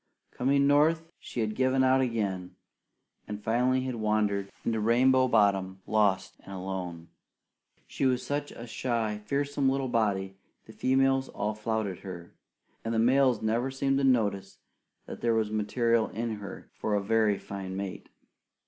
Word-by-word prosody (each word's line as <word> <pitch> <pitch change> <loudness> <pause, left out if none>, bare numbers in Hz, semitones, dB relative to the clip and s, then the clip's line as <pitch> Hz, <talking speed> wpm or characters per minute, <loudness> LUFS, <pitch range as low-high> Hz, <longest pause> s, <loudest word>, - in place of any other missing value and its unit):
Coming 140 +2 +2
North, 160 +3 +3
she 120 - -5
had 110 -1 -1
given 130 +2 +2
out 130 0 +4
again 100 -7 -2 0.7
and 105 0 -6
finally 125 +4 +2
had 130 0 -3
wandered 105 -3 0
into 115 -1 0
Rainbow 130 +4 +4
Bottom, 95 -4 +2
lost 100 -3 +1
and - - -13
alone. 90 -3 -5 0.8
She 135 - -1
was 125 -1 0
such 145 0 -2
a 115 - -9
shy, 115 -3 -2
fearsome 140 +3 0
little 135 -1 -1
body, 100 -5 0 0.3
the 110 - -13
females 135 +1 +2
all 105 +1 -2
flouted 105 -3 -2
her; 85 -3 -9 0.5
and 115 0 -2
the - - +1
males 125 0 +3
never 115 +4 +1
seemed 135 +1 0
to - - 0
notice 110 -7 +1 0.5
that - - -9
there 115 -1 +2
was 110 -1 0
material 115 +2 +1
in 115 -1 -3
her 100 -1 -9
for 105 - -1
a 100 - 0
very 110 -1 +2
fine 95 -1 -6
mate. 100 -1 -6
115 Hz, 155 wpm, -29 LUFS, 100-130 Hz, 0.8 s, out